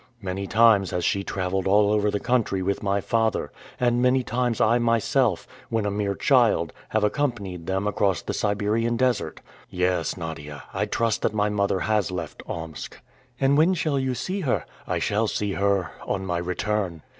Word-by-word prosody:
Many 95 Hz, -1 st, -4 dB
times 110 Hz, -4 st, +5 dB
has 90 Hz, -, -2 dB
she 100 Hz, -, +1 dB
traveled 95 Hz, 0 st, -2 dB
all 105 Hz, +1 st, +4 dB
over 105 Hz, 0 st, +2 dB
the 105 Hz, -, -1 dB
country 115 Hz, -7 st, 0 dB
with 100 Hz, +1 st, -1 dB
my 100 Hz, -1 st, 0 dB
father; 110 Hz, +2 st, 0 dB, 0.3 s
and 120 Hz, -1 st, +2 dB
many 125 Hz, +1 st, +3 dB
times 120 Hz, -2 st, -1 dB
I 115 Hz, +2 st, +4 dB
myself, 115 Hz, -2 st, +1 dB, 0.2 s
when 110 Hz, -2 st, 0 dB
a 105 Hz, -, 0 dB
mere 100 Hz, -1 st, -1 dB
child, -, -, +3 dB, 0.2 s
have 110 Hz, -1 st, 0 dB
accompanied 105 Hz, -, -1 dB
them 95 Hz, +1 st, -1 dB
across 100 Hz, -2 st, +1 dB
the -, -, -3 dB
Siberian 105 Hz, +3 st, 0 dB
desert. 125 Hz, -2 st, 0 dB, 0.3 s
Yes, 90 Hz, -2 st, 0 dB
Nadia, 80 Hz, -4 st, -7 dB
I -, -, -1 dB
trust 115 Hz, -2 st, 0 dB
that -, -, 0 dB
my 105 Hz, 0 st, +2 dB
mother 100 Hz, -2 st, 0 dB
has 105 Hz, +3 st, +1 dB
left 85 Hz, -4 st, -5 dB
Omsk." 80 Hz, -4 st, -6 dB, 0.4 s
"And 140 Hz, +2 st, +3 dB
when 175 Hz, +4 st, +4 dB
shall 155 Hz, -5 st, 0 dB
you 130 Hz, -1 st, -1 dB
see 190 Hz, +9 st, -3 dB
her?" 145 Hz, -10 st, 0 dB, 0.2 s
"I -, -, 0 dB
shall 105 Hz, +2 st, +1 dB
see 105 Hz, -1 st, -2 dB
her 100 Hz, -2 st, +1 dB, 0.2 s
on 95 Hz, -, -2 dB
my 90 Hz, -2 st, -1 dB
return." 90 Hz, -1 st, -2 dB
105 Hz, 180 wpm, -25 LUFS, 95-115 Hz, 0.4 s, times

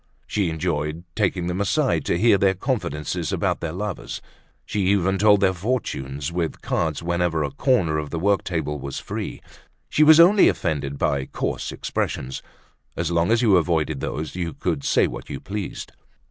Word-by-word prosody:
She 100 Hz, -5 st, 0 dB
enjoyed 80 Hz, -1 st, -2 dB
taking 95 Hz, -4 st, 0 dB
them 90 Hz, +2 st, -2 dB
aside 100 Hz, -, +1 dB
to -, -, +1 dB
hear 105 Hz, 0 st, +4 dB
their 95 Hz, -1 st, +3 dB
confidences 90 Hz, -, -2 dB
about -, -, 0 dB
their 85 Hz, -, -3 dB
lovers. 100 Hz, +2 st, -5 dB, 0.5 s
She 105 Hz, -, -2 dB
even 95 Hz, -1 st, +2 dB
told 105 Hz, 0 st, +5 dB
their 95 Hz, -1 st, +3 dB
fortunes 85 Hz, -, -3 dB
with 85 Hz, -2 st, -3 dB
cards 80 Hz, -1 st, -1 dB
whenever 85 Hz, -2 st, 0 dB
a 70 Hz, -, -2 dB
corner 85 Hz, -, +1 dB
of 75 Hz, -1 st, -5 dB
the 85 Hz, -, -4 dB
work 100 Hz, +4 st, +2 dB
table 75 Hz, -4 st, -2 dB
was 70 Hz, 0 st, -5 dB
free. -, -, -5 dB, 0.5 s
She -, -, +1 dB
was 155 Hz, +1 st, +8 dB
only 190 Hz, +4 st, +7 dB
offended 70 Hz, -4 st, -2 dB
by 70 Hz, -1 st, 0 dB
coarse -, -, -3 dB
expressions. 65 Hz, +1 st, -3 dB, 0.6 s
As -, -, -1 dB
long 85 Hz, 0 st, +2 dB
as 115 Hz, +1 st, +3 dB
you 105 Hz, -5 st, +5 dB
avoided 80 Hz, -4 st, 0 dB
those 75 Hz, +3 st, -4 dB
you 85 Hz, -3 st, -3 dB
could 70 Hz, -, -2 dB
say -, -, +3 dB
what -, -, -6 dB
you -, -, -5 dB
pleased. 100 Hz, -1 st, -6 dB
85 Hz, 175 wpm, -23 LUFS, 75-100 Hz, 0.6 s, was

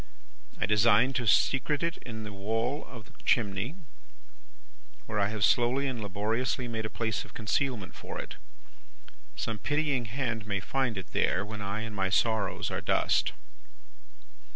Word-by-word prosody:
I -, -, +2 dB
design 115 Hz, +4 st, +5 dB
to 120 Hz, -3 st, -1 dB
secrete 140 Hz, +7 st, +3 dB
it 170 Hz, 0 st, 0 dB
in 110 Hz, -3 st, -7 dB
the 105 Hz, -1 st, -6 dB
wall 115 Hz, +8 st, -1 dB
of 115 Hz, -4 st, -10 dB
the 130 Hz, -, -20 dB
chimney, 110 Hz, -, +1 dB, 1.3 s
where 105 Hz, -1 st, -2 dB
I 100 Hz, -, +3 dB
have 105 Hz, -1 st, +2 dB
slowly 125 Hz, +3 st, +3 dB
and 130 Hz, -4 st, -2 dB
laboriously 110 Hz, +5 st, -1 dB
made 110 Hz, -2 st, -2 dB
a -, -, -11 dB
place 110 Hz, -2 st, -1 dB
of -, -, -16 dB
concealment 110 Hz, -2 st, -1 dB
for -, -, -7 dB
it. -, -, -6 dB, 1.0 s
Some 110 Hz, -2 st, -3 dB
pitying 145 Hz, -3 st, +1 dB
hand 115 Hz, -2 st, -2 dB
may 100 Hz, -2 st, 0 dB
find 130 Hz, 0 st, -1 dB
it 95 Hz, -, -7 dB
there, 95 Hz, +3 st, +2 dB
when 105 Hz, 0 st, -6 dB
I 100 Hz, +2 st, -2 dB
and 110 Hz, -1 st, -5 dB
my 95 Hz, -1 st, +1 dB
sorrows 110 Hz, +1 st, +1 dB
are -, -, -2 dB
dust. -, -, +2 dB
110 Hz, 155 wpm, -30 LUFS, 105-125 Hz, 1.3 s, design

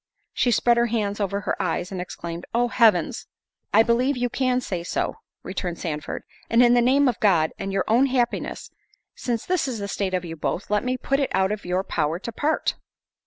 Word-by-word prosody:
She 245 Hz, -, +2 dB
spread 240 Hz, +1 st, +3 dB
her 235 Hz, 0 st, +3 dB
hands 210 Hz, -3 st, -1 dB
over 200 Hz, 0 st, -1 dB
her -, -, -2 dB
eyes, 180 Hz, -, -2 dB
and 185 Hz, -2 st, -3 dB
exclaimed, 170 Hz, -1 st, -7 dB
"Oh, 240 Hz, 0 st, +2 dB
Heavens!" 225 Hz, -1 st, +3 dB, 0.4 s
"I 220 Hz, +2 st, +6 dB
believe 250 Hz, +4 st, +2 dB
you 245 Hz, -1 st, -1 dB
can 255 Hz, -1 st, +1 dB
say 185 Hz, -8 st, -4 dB
so," 170 Hz, -, -2 dB, 0.3 s
returned 180 Hz, -2 st, -4 dB
Sandford; 155 Hz, -2 st, -4 dB, 0.3 s
"and 230 Hz, +2 st, +5 dB
in 240 Hz, 0 st, +6 dB
the 245 Hz, -, +5 dB
name 270 Hz, +3 st, +4 dB
of 245 Hz, -, 0 dB
God, 170 Hz, -7 st, +3 dB
and 195 Hz, 0 st, -3 dB
your 195 Hz, -1 st, 0 dB
own 240 Hz, +5 st, +4 dB
happiness, 250 Hz, -2 st, -1 dB, 0.4 s
since 235 Hz, -3 st, -3 dB
this 360 Hz, -6 st, 0 dB
is 250 Hz, -3 st, -3 dB
the 200 Hz, -1 st, -4 dB
state 195 Hz, -2 st, -1 dB
of 180 Hz, -1 st, -2 dB
you 165 Hz, -1 st, -6 dB
both, 175 Hz, +6 st, -3 dB
let 210 Hz, -, +2 dB
me 255 Hz, 0 st, -1 dB
put 275 Hz, +2 st, 0 dB
it 275 Hz, -, 0 dB
out 190 Hz, +1 st, +2 dB
of 210 Hz, -3 st, -4 dB
your 180 Hz, +2 st, 0 dB
power 160 Hz, -3 st, -1 dB
to 215 Hz, +6 st, -6 dB
part." 295 Hz, +7 st, 0 dB
215 Hz, 215 wpm, -24 LUFS, 185-245 Hz, 0.4 s, I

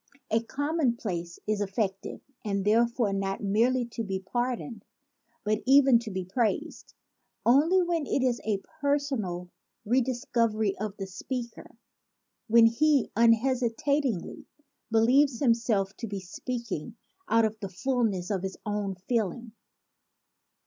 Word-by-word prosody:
A 225 Hz, +1 st, +3 dB
commonplace 235 Hz, -, -2 dB
is 210 Hz, -1 st, -1 dB
effective 195 Hz, -1 st, -3 dB, 0.2 s
and 200 Hz, -2 st, -2 dB
therefore 230 Hz, 0 st, +2 dB
not 195 Hz, +1 st, -2 dB
merely 235 Hz, +5 st, +2 dB
to 230 Hz, 0 st, -4 dB
be 195 Hz, -2 st, -3 dB
pardoned 240 Hz, +2 st, -3 dB, 0.6 s
but 215 Hz, +1 st, 0 dB
even 270 Hz, -3 st, +6 dB
to 230 Hz, -1 st, -7 dB
be 190 Hz, -2 st, -4 dB
praised, 215 Hz, +4 st, -2 dB, 0.5 s
only 315 Hz, +10 st, +5 dB
when 335 Hz, -4 st, -1 dB
it 270 Hz, -, +1 dB
is 245 Hz, -2 st, +1 dB
a 205 Hz, -3 st, -1 dB, 0.2 s
personal 260 Hz, -12 st, -1 dB, 0.3 s
redis 245 Hz, +2 st, 0 dB
covery 220 Hz, -3 st, +2 dB
of 210 Hz, -1 st, -4 dB
the 195 Hz, -, -4 dB
speaker, 235 Hz, +5 st, -7 dB, 0.7 s
when 230 Hz, 0 st, +6 dB
he 280 Hz, +4 st, +3 dB
unhesitatingly 235 Hz, -, +1 dB, 0.4 s
believes 240 Hz, +3 st, +4 dB
himself 230 Hz, -6 st, +1 dB
to 230 Hz, -, -5 dB
be 200 Hz, -1 st, -4 dB
speaking 225 Hz, +1 st, -5 dB, 0.3 s
out 230 Hz, 0 st, +4 dB
of 220 Hz, 0 st, -3 dB
the 195 Hz, -2 st, -5 dB
ful 245 Hz, +6 st, -1 dB
ness 195 Hz, -3 st, -1 dB
of 195 Hz, -3 st, -1 dB
his 190 Hz, 0 st, -5 dB
own 205 Hz, -2 st, -2 dB
feeling. 235 Hz, 0 st, -1 dB
230 Hz, 130 wpm, -28 LUFS, 200-255 Hz, 0.7 s, even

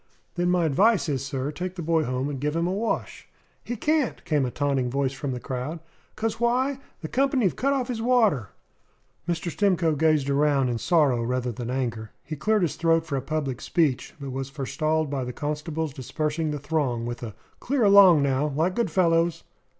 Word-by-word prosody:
"Then 175 Hz, 0 st, 0 dB
my 180 Hz, -2 st, +2 dB
advice 195 Hz, +7 st, +3 dB
is, 135 Hz, -4 st, -1 dB
sir 135 Hz, +1 st, -3 dB
take 180 Hz, +4 st, -5 dB
the 175 Hz, -, -5 dB
boy 160 Hz, -1 st, +1 dB
home 130 Hz, +2 st, -2 dB
and 145 Hz, -2 st, -4 dB
give 150 Hz, +3 st, -1 dB
him 165 Hz, 0 st, +1 dB
a 180 Hz, -, 0 dB
wash." 220 Hz, +4 st, -3 dB, 0.4 s
"He 240 Hz, -, -4 dB
can't," 300 Hz, +2 st, 0 dB
came 145 Hz, -5 st, +1 dB
a -, -, -2 dB
taunting 135 Hz, -2 st, 0 dB
voice 135 Hz, +1 st, 0 dB
from 135 Hz, 0 st, -4 dB
the 125 Hz, -, -4 dB
crowd. 130 Hz, +7 st, -4 dB, 0.4 s
"'Cos 225 Hz, 0 st, -2 dB
why? 255 Hz, +3 st, +1 dB, 0.2 s
The 160 Hz, -, -4 dB
company 265 Hz, -, +2 dB
've -, -, -3 dB
cut 275 Hz, +2 st, +1 dB
off 265 Hz, -3 st, 0 dB
his 235 Hz, -3 st, -3 dB
water." 225 Hz, -, +2 dB, 0.8 s
Mr. 170 Hz, 0 st, -1 dB
Stimcoe 180 Hz, -4 st, +2 dB
gazed 155 Hz, -2 st, +2 dB
around 140 Hz, -2 st, +2 dB
in 120 Hz, -1 st, -2 dB
sorrow 145 Hz, -8 st, +3 dB
rather 125 Hz, +1 st, -1 dB
than 120 Hz, +1 st, -6 dB
in 125 Hz, -, -1 dB
anger. 115 Hz, -4 st, -3 dB
He 155 Hz, -, -6 dB
cleared 210 Hz, +7 st, +1 dB
his 165 Hz, -, -1 dB
throat 165 Hz, -1 st, +2 dB
for 150 Hz, -4 st, -3 dB
a 135 Hz, -, -1 dB
public 135 Hz, -3 st, -3 dB
speech; 145 Hz, -7 st, 0 dB
but 140 Hz, -2 st, -6 dB
was 135 Hz, +1 st, -4 dB
forestalled 155 Hz, +2 st, -1 dB
by 135 Hz, -2 st, -1 dB
the 125 Hz, 0 st, -5 dB
constable's 150 Hz, +1 st, -3 dB
dispersing 150 Hz, +4 st, -2 dB
the 150 Hz, -, -2 dB
throng 140 Hz, -6 st, -1 dB
with 120 Hz, 0 st, -5 dB
a 110 Hz, -4 st, -7 dB, 0.2 s
"Clear 265 Hz, -1 st, 0 dB
along, 195 Hz, -7 st, +7 dB
now, 140 Hz, +1 st, +1 dB
like 160 Hz, +5 st, 0 dB
good 235 Hz, +2 st, 0 dB
fellows!" 170 Hz, -2 st, +2 dB
155 Hz, 205 wpm, -25 LUFS, 135-180 Hz, 0.8 s, along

